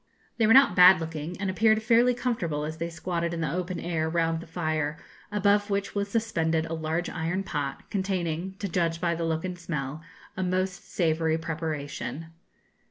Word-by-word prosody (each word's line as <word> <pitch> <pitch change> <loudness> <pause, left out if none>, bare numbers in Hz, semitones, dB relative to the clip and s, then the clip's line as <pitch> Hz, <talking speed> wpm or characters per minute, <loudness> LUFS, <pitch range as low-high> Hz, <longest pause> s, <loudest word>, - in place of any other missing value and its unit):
They 225 -2 +3
were 225 - +7
not 270 -9 +7
bad 180 0 +8
looking, 160 +1 -5
and 200 - -1
appeared 220 +3 +3
fairly 240 +2 +4
comfortable, 170 -13 -1
as 155 +1 -5
they 170 +1 -3
squatted 170 0 -2
in 165 - -3
the 155 -2 -1
open 180 0 -3
air 160 -2 -1
round 165 0 +1
the 170 - -10
fire, 155 -2 -2 0.3
above 205 0 +2
which 200 0 -1
was 200 0 -1
suspended 165 -8 0
a 165 - -5
large 160 +2 -2
iron 175 +3 -2
pot, 145 -6 -4
containing, 190 -2 -2
to 200 - -3
judge 165 -2 0
by 170 -1 +1
the 165 0 -2
look 160 +1 -1
and 180 -1 -5
smell, 150 -3 -4 0.3
a 190 - -3
most 185 0 -2
savoury 160 -2 +1
preparation. 160 -1 -4
170 Hz, 180 wpm, -27 LUFS, 160-190 Hz, 0.3 s, bad